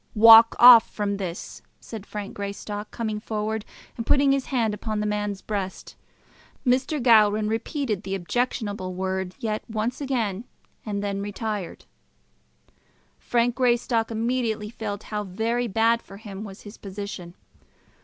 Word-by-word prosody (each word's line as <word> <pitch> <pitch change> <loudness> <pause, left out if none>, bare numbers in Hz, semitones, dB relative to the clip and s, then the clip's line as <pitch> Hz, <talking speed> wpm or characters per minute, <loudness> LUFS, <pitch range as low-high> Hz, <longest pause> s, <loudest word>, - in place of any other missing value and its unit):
"Walk 225 +1 +9
off 240 -2 +9
from 200 -1 -2
this!" 180 -3 -6 0.2
said 220 -3 -9
Frank 205 -1 -6
Greystock, 205 +1 -6
coming 215 -3 -3
forward 215 0 -3 0.3
and 230 - -4
putting 275 +3 +3
his 275 -1 0
hand 230 -5 0
upon 215 +1 -3
the 210 - -1
man's 210 -1 -2
breast. 195 -3 -5 0.7
Mr. 260 +4 +1
Gowran 215 -3 +4
repeated 225 - -2
the 195 -2 -4
objectionable 200 -1 -2
word 190 0 -3
yet 220 -5 -2
once 225 +5 -2
again, 235 -6 -2 0.4
and 205 -2 -3
then 200 -1 -2
retired. 205 -2 -5 1.3
Frank 240 0 +1
Greystock 240 -2 +1
immediately 225 -2 -2
felt 210 -3 -5
how 210 -1 -4
very 225 +5 -1
bad 225 +2 +2
for 195 - -13
him 205 -1 -8
was 195 -2 -10
his 205 +1 -12
position. 195 -3 -7
215 Hz, 135 wpm, -25 LUFS, 200-230 Hz, 1.3 s, Walk